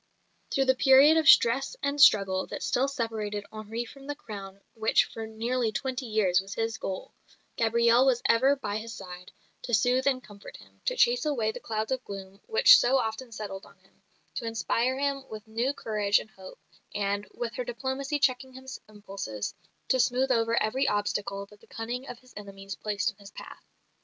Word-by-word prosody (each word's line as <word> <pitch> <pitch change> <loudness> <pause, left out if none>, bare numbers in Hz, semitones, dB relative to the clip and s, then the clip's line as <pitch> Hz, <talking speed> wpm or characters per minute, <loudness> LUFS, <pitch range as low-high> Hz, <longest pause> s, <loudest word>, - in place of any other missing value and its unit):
Through 270 - +1
the 260 - +4
period 270 +4 +6
of 315 -2 +4
stress 265 - +5
and 280 +1 0
struggle 195 -6 +5
that - - -6
still 265 +2 +1
separated 220 -6 -3
Henri 220 +2 -5
from 275 +3 -13
the 290 - -3
crown 200 -6 -9
which 220 -1 +3
for 225 -1 -7
nearly 230 +1 -1
twenty 260 +2 -3
years 195 -4 +2
was 195 +1 -9
his 225 0 -2
goal, 190 -1 -5 0.4
Gabrielle 235 +2 +3
was 245 -2 +2
ever 260 +5 +4
by 210 -6 -4
his 230 +1 -7
side, 180 -3 -10 0.3
to 240 - +1
soothe 250 +5 +2
and 255 -2 +1
comfort 205 -1 -12
him, - - -20
to - - 0
chase 485 -2 +3
away 245 -8 0
the - - -8
clouds 220 +2 -3
of 260 -1 -1
gloom 195 0 -9
which 485 +2 +7
so 260 +2 +3
often 230 +1 -3
settled 200 -3 -7
on - - -20
him, 190 +1 -31 0.3
to 235 - -5
inspire 230 +3 0
him 280 -1 -1
with 215 0 -9
new 230 +5 -1
courage 210 -6 +1
and 215 - -6
hope, 190 -2 -12 0.4
and, 200 0 -1
with 485 +2 -4
her - - -3
diplomacy 275 - -3
checking 260 -2 0
his 260 0 -9
impulses, 195 - -6 0.4
to 260 - +3
smooth 255 +1 +2
over 230 -1 +2
every 260 +6 0
obstacle 205 -1 -1
that 205 +1 -19
the - - -20
cunning 245 +4 -5
of 245 - -7
his 255 +1 -21
enemies 195 -1 -8
placed 205 0 -2
in - - -29
his 200 -1 -13
path. - - -11
230 Hz, 190 wpm, -28 LUFS, 205-265 Hz, 0.4 s, which